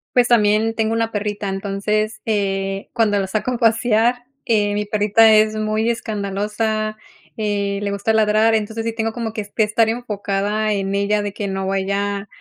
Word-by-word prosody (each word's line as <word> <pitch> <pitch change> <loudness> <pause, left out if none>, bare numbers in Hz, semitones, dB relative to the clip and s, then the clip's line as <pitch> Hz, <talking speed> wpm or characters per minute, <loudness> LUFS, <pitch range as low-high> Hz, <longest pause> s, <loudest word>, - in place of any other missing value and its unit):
Pues 245 -1 +5
también 220 -1 +3
tengo 220 0 0
una 225 0 0
perrita. 205 -1 -3
Entonces, 210 +2 -2
eh, 195 -2 -1
cuando 220 -4 +2
la 195 - -2
saco 215 +5 -2
a 245 - -2
pasear, 230 +1 +2 0.2
eh, 210 -4 +2
mi 210 0 -1
perrita 215 +2 +4
es 215 0 +4
muy 215 +1 0
escandalosa, 215 0 -2 0.4
eh, 200 -2 -1
le 200 - -2
gusta 200 +2 -1
ladrar. 220 +1 +3
Entonces, 220 +1 -2
sí 230 - -1
tengo 225 0 -2
como 230 -2 -4
que 215 - -3
est 205 +2 -13
estar 220 +1 +3
enfocada 210 -2 -1
en 195 0 -2
ella, 205 +1 +1
de 205 -1 -3
que 205 -1 -4
no 190 0 -3
vaya 200 +1 -1
215 Hz, 175 wpm, -20 LUFS, 200-225 Hz, 0.4 s, Pues